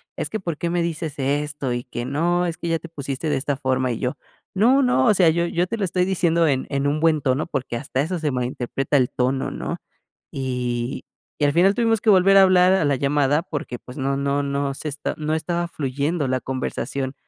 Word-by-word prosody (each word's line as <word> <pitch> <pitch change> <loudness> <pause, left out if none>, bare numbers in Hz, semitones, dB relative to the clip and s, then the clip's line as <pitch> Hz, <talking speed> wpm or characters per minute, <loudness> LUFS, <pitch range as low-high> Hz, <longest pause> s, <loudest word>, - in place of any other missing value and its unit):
"Es - - -4
que 220 - -2
por 170 -5 -4
qué 170 +1 -2
me 175 - +1
dices 165 -2 -3
esto, 145 -1 -1
y 120 0 -2
que 120 -1 -5
no, 170 +7 0
es 170 - -4
que - - -5
ya 165 -1 0
te 165 - -10
pusiste 140 -1 -4
de 150 - +1
esta 140 0 -2
forma", 130 -2 0
y 115 - -3
yo: 125 0 -2 0.4
"No 245 +8 +4
no, 245 - +3
o - - +5
sea 180 -4 +5
yo 170 +2 +1
yo 175 +1 0
te 230 - -3
lo 200 - 0
estoy 180 +1 0
diciendo 170 -3 +2
en 130 -2 0
en 140 0 0
un 150 +2 0
buen 160 -2 +3
tono", 135 +2 0
porque 135 -7 -4
hasta 130 +1 -2
eso 175 +5 -2
se 155 -3 -1
malinterpreta, 130 +2 -1
el 125 -2 +2
tono, 130 +1 -1
¿no? - - -4 0.5
Y 125 -2 -3 0.3
y 145 - +3
al 145 - +2
final 185 +5 +4
tuvimos 225 -2 +1
que 220 - +4
volver 195 +1 +5
a 195 - +9
hablar 185 0 +5
a 180 - +2
la 140 -2 +2
llamada, 145 +2 +2
porque 145 -7 -5
pues, 125 +3 -12
no 135 0 -1
no 140 +1 0
no 140 0 -1
se 155 - -5
está 145 0 -3
no 155 0 -2
estaba 170 +2 -1
fluyendo 145 +1 -2
la 130 0 0
conversación 130 +1 -3
145 Hz, 235 wpm, -22 LUFS, 135-170 Hz, 0.5 s, a